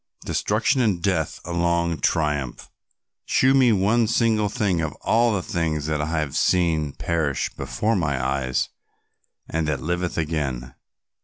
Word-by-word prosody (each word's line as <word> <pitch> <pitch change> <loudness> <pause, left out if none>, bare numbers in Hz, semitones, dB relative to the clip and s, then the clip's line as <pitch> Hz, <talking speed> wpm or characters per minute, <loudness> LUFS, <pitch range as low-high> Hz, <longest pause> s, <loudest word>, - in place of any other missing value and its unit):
Destruction 115 +6 +1
and 105 -7 +1
death 85 -4 -1
alone 85 -1 0
triumph. 75 -5 -1 0.6
Shew 130 +1 +4
me 130 -3 +5
one 110 +3 +2
single 110 -2 +2
thing 100 -7 0
of 80 - -2
all 115 +1 +3
the 100 -4 -1
things 80 -4 -2
that 75 -1 -1
I 80 +2 -1
have 75 -2 -3
seen 80 -5 +2
perish 80 -5 -1
before 105 - -1
my 75 -8 0
eyes 65 0 -1 0.8
and 80 -1 -1
that 75 -3 -1
liveth 85 +5 -2
again. 70 -6 -2
85 Hz, 140 wpm, -23 LUFS, 75-105 Hz, 0.8 s, me